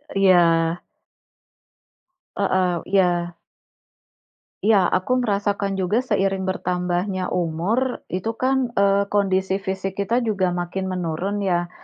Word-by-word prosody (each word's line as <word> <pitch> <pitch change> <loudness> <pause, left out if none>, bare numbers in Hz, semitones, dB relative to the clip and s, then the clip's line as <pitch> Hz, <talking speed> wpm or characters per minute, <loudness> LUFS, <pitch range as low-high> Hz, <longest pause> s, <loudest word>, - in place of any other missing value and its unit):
E - - +1
iya. 170 -3 +4 1.5
Heeh, 185 -3 +1
iya. 175 -3 +1 1.3
Iya, 205 -4 +4
aku 250 +7 0
merasakan 200 -3 -1
juga 195 +5 +1
seiring 195 -5 0
bertambahnya 180 +1 -2
umur, 180 +10 -1
itu 185 +5 -2
kan, 260 -2 +1
eee, 200 0 +3
kondisi 190 -1 +1
fisik 190 0 -3
kita 235 +4 0
juga 195 -4 +1
makin 180 +2 -3
menurun 180 +2 -2
ya. 175 -2 0
190 Hz, 105 wpm, -22 LUFS, 180-200 Hz, 1.5 s, iya